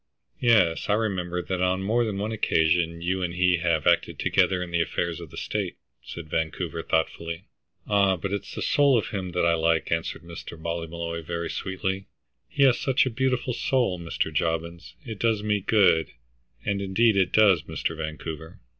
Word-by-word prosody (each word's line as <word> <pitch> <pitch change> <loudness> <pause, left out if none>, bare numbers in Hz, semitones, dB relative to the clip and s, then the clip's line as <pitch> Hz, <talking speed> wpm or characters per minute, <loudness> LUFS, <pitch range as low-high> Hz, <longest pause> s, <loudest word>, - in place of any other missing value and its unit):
"Yes, 110 -10 +3
I - - +4
remember 90 -5 -2
that 95 -1 -3
on 90 +1 +1
more 115 +5 +2
than 105 -4 -2
one 105 +2 -2
occasion 85 -4 +1
you 95 +2 0
and 85 -1 -2
he 90 0 +3
have 85 -3 0
acted - - +2
together 90 -1 +2
in 90 - -8
the 85 -1 +2
affairs 85 0 -2
of 85 -3 -9
the - - -12
state," - - -3 0.2
said 85 -2 -8
Vancouver, 80 +1 -2
thoughtfully. 85 +2 -2 0.4
'"Ah, 100 -2 +3
but 95 +4 -4
it's 100 -1 -5
the - - -3
soul 140 -3 +4
of 105 - -1
him 95 -4 -4
that 90 - +1
I 85 - +4
like," 80 0 +1
answered 80 0 -2
Mr. 85 -1 -9
Ballymolloy 85 0 -4
very 85 +1 -4
sweetly. 95 0 -3 0.4
"He 140 - +2
has 130 -3 +5
such 135 -1 +2
a 130 - -1
beautiful 125 0 0
soul, 120 -7 0
Mr. 85 -1 -2
Jobbins; 85 +2 -2
it 110 -4 -6
does 110 -3 +1
me 105 -1 +1
good, 95 -5 +3 0.6
and 100 -1 0
indeed 100 +3 +3
it 95 -2 +2
does, 100 -6 +5
Mr. 80 +1 -3
Vancouver." 80 0 -6
90 Hz, 180 wpm, -26 LUFS, 85-105 Hz, 0.6 s, has